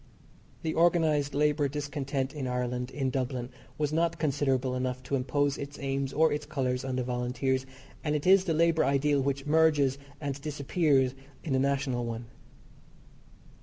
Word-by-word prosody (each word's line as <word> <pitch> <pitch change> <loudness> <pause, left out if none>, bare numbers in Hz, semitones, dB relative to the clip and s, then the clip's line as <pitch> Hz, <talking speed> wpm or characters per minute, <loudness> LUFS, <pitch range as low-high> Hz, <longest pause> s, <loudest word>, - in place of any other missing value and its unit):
The 160 -1 -1
organised 160 -4 +2
labour 150 0 +2
discontent 140 -1 -3
in 140 -4 -4
Ireland, 125 0 -2
in 135 -1 -2
Dublin, 125 -1 -2 0.3
was 150 0 -1
not 170 +1 +1
considerable 135 -4 0
enough 130 0 -2
to 135 +2 -1
impose 140 +2 0
its 140 +1 -6
aims 135 -1 -2
or 160 +2 +3
its 150 - -4
colours 125 -1 -1
on 130 -1 -3
the 125 - 0
Volunteers, 125 +2 -1 0.4
and 150 -1 0
it 145 - -2
is 190 +1 +6
the 165 - +1
labour 165 0 +3
ideal 140 +1 +2
which 140 0 -1
merges 150 -3 +3 0.2
and 140 -2 -4
disappears 140 -2 +1 0.3
in 150 - -2
the 130 - +3
national 135 -2 0
one. 115 0 -4
140 Hz, 160 wpm, -29 LUFS, 130-150 Hz, 0.4 s, is